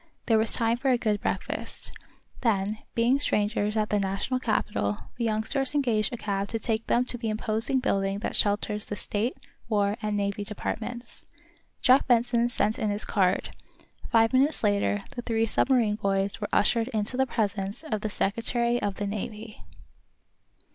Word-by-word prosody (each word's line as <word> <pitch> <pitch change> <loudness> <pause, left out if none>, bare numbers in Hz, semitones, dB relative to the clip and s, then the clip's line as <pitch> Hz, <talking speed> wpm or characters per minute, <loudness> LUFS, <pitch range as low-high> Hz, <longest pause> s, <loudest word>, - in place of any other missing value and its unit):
There 225 -2 +4
was 220 0 +1
time 230 0 +1
for 270 +2 0
a 250 - +4
good 215 -3 0
breakfast. - - -3 0.5
Then, 215 -2 +1 0.2
being 240 +4 +3
strangers 210 -4 0
at 215 -1 0
the 210 - +3
national 195 +6 -1
capital, 210 - 0 0.2
the 235 - -1
youngsters 230 +6 0
engaged 230 -7 +1
a 240 - -4
cab 200 -2 -2
to 225 - -2
take 225 0 -2
them 245 +1 +3
to 245 -1 -2
the 225 -2 -2
imposing 220 +4 0
building 195 -4 0
that 205 - -3
shelters 210 0 +1
the 205 - -4
State, 215 +4 -2 0.3
War 205 -1 +1
and 210 -1 -1
Navy 200 0 -1
Departments. 225 +3 -5 0.6
Jack 260 +1 +5
Benson 240 -1 +3
sent 215 -2 0
in 215 - 0
his 205 +1 -2
card. 190 -2 +1 0.5
Five 225 +1 +4
minutes 275 +3 +3
later 205 -1 +1
the 250 -3 -5
three 225 -1 +1
submarine 225 -2 +2
boys 195 -1 0
were - - -2
ushered 230 +2 +2
into 220 -1 -2
the 265 +1 +2
presence 205 0 -1
of 215 -9 -3
the 215 - -2
Secretary 235 +4 0
of 200 -1 -1
the 205 - -3
Navy. 210 +2 -6
220 Hz, 170 wpm, -27 LUFS, 205-240 Hz, 0.6 s, Jack